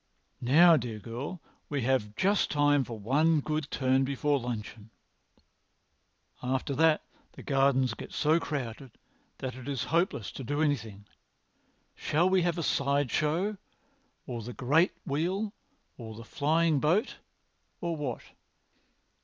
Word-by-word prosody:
Now, 160 +7 +6
dear 115 -4 -4
girl, 120 - -6 0.3
we 140 -4 -1
have 115 -5 0
just 200 - +2
time 145 -1 +3
for 115 -2 -7
one 150 +9 +2
good 155 0 -2
turn 130 -1 +2
before 140 +1 0
luncheon. 115 -3 -6 1.5
After 130 +2 -1
that 160 +2 +3 0.3
the - - -11
gardens 135 -3 +2
get - - -9
so 155 +2 +2
crowded 130 -5 -5 0.4
that 130 -1 -4
it 130 +1 -10
is 135 -3 -2
hopeless 165 - +1
to 135 - -7
do 145 +5 -2
anything. 110 -9 -2 0.9
Shall 165 +4 +1
we 185 0 +3
have 175 0 0
a 170 - -2
side 140 -2 +1
show, 175 +8 0 0.7
or 120 -2 -5
the 120 +3 -7
great 150 +10 +2
wheel, 185 +9 -1 0.5
or 110 -2 -8
the 115 - -9
flying 155 +3 +2
boat, 175 - +1 0.6
or 170 -1 -2
what?" 140 -6 -4
140 Hz, 135 wpm, -29 LUFS, 125-160 Hz, 1.5 s, Now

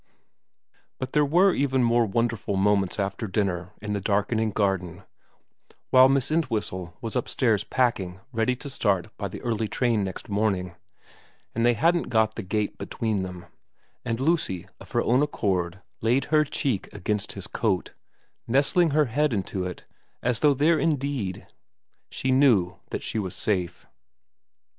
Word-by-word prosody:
But 130 0 -5
there 150 - +4
were 175 +6 +4
even 135 -2 +1
more 120 -1 +3
wonderful 115 -2 -1
moments 100 -1 +2
after 100 +2 -2
dinner 90 -3 -1
in 105 -1 -2
the 100 - -2
darkening 105 +3 +1
garden, 95 -3 -1 0.9
while 130 0 +8
Miss 135 +1 +1
Entwhistle 105 - -2
was 115 -1 -4
upstairs 115 -4 +1
packing 100 -9 0
ready 115 +2 +1
to 135 - -9
start 100 -9 0
by 100 - -3
the 95 - -9
early 115 -2 -1
train 115 -2 +1
next 95 -1 -5
morning, 100 -4 0 0.8
and 115 - -1
they 120 0 +4
hadn't 170 +7 +2
got 110 -2 +2
the 115 - -5
gate 105 +2 -2
between 110 -4 -2
them, 90 -1 -7 0.6
and 115 0 -2
Lucy 135 - 0
of - - -13
her - - +2
own 125 +4 +3
accord 95 - -1 0.2
laid 125 +4 +2
her 155 0 +5
cheek 135 -7 -2
against 100 +1 -2
his 100 - -7
coat, 100 -6 -1 0.5
nestling 140 +7 +3
her 150 +1 +3
head 145 +3 +1
into 95 -2 -2
it 90 -1 -7 0.4
as 120 -2 +2
though 145 -2 +4
there 155 +4 +3
indeed 140 - -1 0.6
she 130 - -1
knew 120 -10 +4
that - - -4
she 110 - -1
was 95 -4 -4
safe. 90 -4 -1
110 Hz, 150 wpm, -26 LUFS, 95-130 Hz, 0.9 s, while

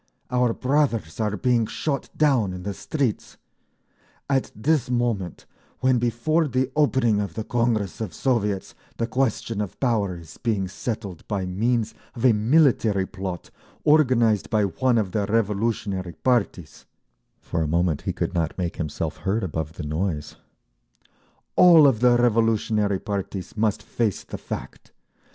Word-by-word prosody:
Our 125 -1 +2
brothers 125 - 0
are 105 -1 0
being 120 0 +2
shot 140 +2 -3
down 130 -11 +2
in 90 0 -7
the 100 +1 -3
streets! 135 - -3 0.9
At 135 -2 0
this 140 +3 +1
moment, 120 -8 -1 0.4
when 130 -1 +3
before 120 +8 +1
the 130 0 0
opening 130 -8 +2
of 95 -5 -5
the 110 - -3
Congress 115 -5 -1
of 110 -5 -3
Soviets 105 - -1 0.2
the 115 - 0
question 115 -3 -1
of 105 - -6
Power 105 -8 0
is 85 -2 -13
being 105 -5 0
settled 100 -2 -5
by 100 -3 -2
means 110 +4 0 0.2
of 120 +1 -2
a 125 - +6
military 110 -4 +3
plot 95 -2 -6 0.3
organised 120 - +3
by 105 +2 +2
one 120 +7 +1
of 100 -4 0
the 100 -1 -1
revolutionary 105 -4 -1
parties—" 100 - -1 0.5
for 80 - -3
a 80 - 0
moment 85 -1 +1
he - - -2
could - - -3
not 85 -2 -1
make 90 -2 -3
himself 80 0 -3
heard 100 +5 -1
above 80 -3 -3
the 85 - -7
noise, 75 -1 -3 1.2
"All 170 -4 +8
of 130 -6 +4
the 120 0 +5
revolutionary 110 -3 +2
parties 100 -2 -5
must 110 -1 0
face 110 -5 -1
the - - -8
fact! - - -8
110 Hz, 145 wpm, -24 LUFS, 95-125 Hz, 1.2 s, All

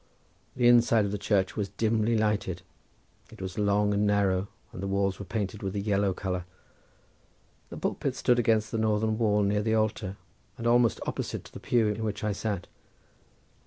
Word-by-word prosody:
The 120 -1 +3
inside 120 -3 +5
of 100 - -3
the 105 - -3
church 95 -2 +1
was 100 -2 -2
dimly 110 +2 +1
lighted; 105 -4 -1 0.7
it 110 -2 -14
was 95 +1 -5
long 105 0 +2
and 105 +1 +2
narrow, 100 -2 +2 0.3
and - - -7
the 100 - -3
walls 95 -1 0
were 100 - -6
painted 105 0 -3
with 95 0 -4
a - - 0
yellow 100 -1 +1
colour. 90 -1 -3 1.2
The - - -8
pulpit - - -2
stood 125 -1 +2
against 110 -2 +2
the 115 - -1
northern 110 0 +1
wall 105 -2 +3
near 105 +1 +1
the 110 +1 +1
altar, 105 -3 -1 0.4
and 115 - -6
almost 120 -4 +3
opposite - - -4
to - - -14
the - - -8
pew 120 -2 +2
in 105 +1 -2
which 105 -1 -3
I 105 - +1
sat. 100 -3 -3
105 Hz, 185 wpm, -28 LUFS, 100-110 Hz, 1.2 s, inside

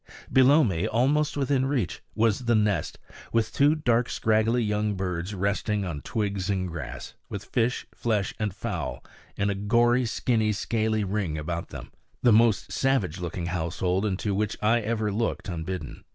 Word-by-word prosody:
Below 135 +4 +6
me, 95 -3 0
almost 140 +7 +1
within 135 -1 +1
reach, 120 - -1
was 115 +2 +1
the 120 -1 +3
nest, 105 -6 +1 0.3
with 115 -1 +1
two 145 +2 +4
dark, 120 -5 +1
scraggly 110 +2 +2
young 105 -1 0
birds 90 +1 -3
resting 100 +1 0
on 80 -5 -4
twigs 100 -4 -2
and 95 -2 0
grass, 80 -7 -7 0.2
with - - -6
fish, 120 +1 0
flesh 105 -5 -1
and 105 -2 0
fowl - - -4 0.3
in 100 0 +1
a - - 0
gory, 120 +5 +2
skinny, 110 -1 +1
scaly 110 +1 0
ring 95 -5 -2
about 85 +2 -4
them - - -9 0.3
the 120 -3 +6
most 115 -1 +3
savage 105 - 0
looking 90 0 -4
household 90 +2 -1
into 100 0 -1
which 105 +1 -1
I 115 +3 +3
ever 110 -1 -1
looked 110 +3 -2
unbidden. 85 -3 -5
105 Hz, 160 wpm, -26 LUFS, 95-120 Hz, 0.3 s, Below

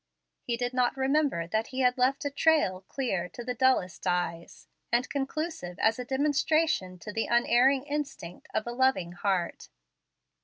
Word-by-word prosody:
He 235 -1 -2
did 245 +1 -2
not 250 +1 +1
remember 270 - +1
that 220 +6 -1
he 260 0 -3
had 250 -1 +3
left 265 +4 +1
a 285 - -1
trail 285 - +2
clear 190 -10 -2
to 240 - -8
dullest 245 -9 +1
eyes, 175 -1 -2 0.2
and 240 +2 +2
conclusive 280 - -4
as 225 +2 +2
a 250 - -4
demonstration 290 - +1
to 210 +4 -8
the 225 - -1
unerring 245 +3 +3
instinct 285 - -5
of 215 - -1
a 240 - -4
loving 245 -9 +1
heart. 175 -1 -2
245 Hz, 155 wpm, -28 LUFS, 185-275 Hz, 0.2 s, had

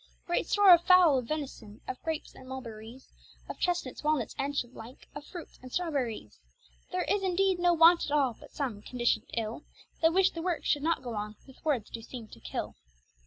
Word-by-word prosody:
Great 345 - 0
store 405 -3 +7
of 345 - +6
fowle, 350 -7 +6
of 245 - -7
venison, 255 -8 -5
of 255 - -5
grapes 320 -2 -4
and 260 0 -13
mulberries, 235 -1 -8 0.4
Of - - -7
chestnuts, 345 -8 -1
walnuts, 300 -6 0
and 280 +1 -1
such 240 -2 -1
like, 240 +1 -12
of 290 - -7
fruits 345 +2 -10
and 255 0 -11
strawberries, 265 - -2 0.5
There - - 0
is 405 - +1
indeed 380 0 +2
no 350 0 +4
want 335 +1 +6
at - - -6
all, 280 -5 +3
but - - -13
some, 245 -8 -3
condiciond 240 +2 -1
ill, 225 +3 -2 0.4
That 325 0 +5
wish 380 +2 +4
the 330 - -6
worke 345 -1 -2
should 290 - +2
not 325 -3 0
goe 240 -2 -5
on 210 0 -4
with 265 - -17
words 280 -9 0
doe 230 - -6
seeme 230 0 -9
to - - -12
kill. - - -5
280 Hz, 205 wpm, -30 LUFS, 240-340 Hz, 0.5 s, store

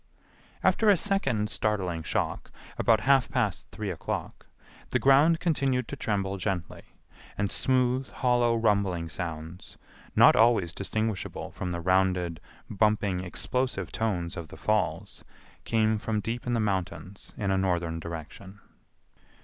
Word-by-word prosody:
After 220 - +4
a 200 - +6
second 135 - 0
startling 95 -6 -1
shock, - - -2 0.3
about 110 -2 +4
half 135 +2 +3
past 110 -8 -1
three 105 -3 -4
o'clock, 85 - -5 0.4
the - - +2
ground 145 +5 +5
continued 135 -7 0
to - - -4
tremble 100 -2 -2
gently, 90 -3 -3 0.6
and 100 -1 -1
smooth, 130 0 +1
hollow 120 -2 +2
rumbling 100 -7 +1
sounds, 80 0 -7 0.4
not - - +7
always 110 -7 +4
distinguishable 110 +1 -3
from 90 -2 -4
the 85 0 -3
rounded, 90 -2 +1 0.3
bumping, 105 -2 +1
explosive 125 +8 -2
tones 90 -7 -2
of 85 -3 -6
the - - -12
falls, - - -1 0.4
came 110 -1 +2
from 110 0 -1
deep 115 +4 -4
in 120 - 0
the 115 - +1
mountains 95 -3 -3
in 100 -2 -1
a - - +2
northern 85 -3 -1
direction. 85 +4 -8
105 Hz, 135 wpm, -28 LUFS, 90-120 Hz, 0.6 s, not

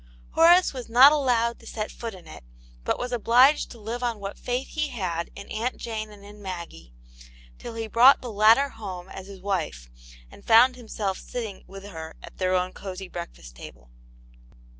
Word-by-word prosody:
Horace 345 +2 +5
was 255 -3 -7
not 255 +5 +8
allowed 245 -5 +1
to - - -15
set 215 -1 -4
foot 230 -4 -7
in 180 -2 -14
it, 155 - -12 0.4
but - - 0
was 245 0 -4
obliged 245 +5 +4
to 235 - -12
live 225 +3 -5
on 240 -2 -1
what 200 0 -6
faith 250 +2 -3
he 305 -1 -2
had 180 - -3
in 200 - -10
Aunt 230 +4 -3
Jane 220 -2 -5
and 205 -1 -14
in 205 0 -13
Maggie, 170 - -8 0.7
till 230 - -8
he 225 0 -3
brought 240 +5 +6
the 245 - -7
latter 220 +7 +5
home 190 -6 -8
as 190 0 -9
his 195 -2 -11
wife, 160 - -3 0.4
and - - -15
found 245 +3 +6
himself 215 -5 -4
sitting 225 -5 -6
with 195 0 -11
her 160 -5 -9
at - - -13
their 185 0 +1
own 185 0 -1
cosy 190 -1 -8
breakfast - - -9
table. - - -13
215 Hz, 185 wpm, -25 LUFS, 185-245 Hz, 0.7 s, not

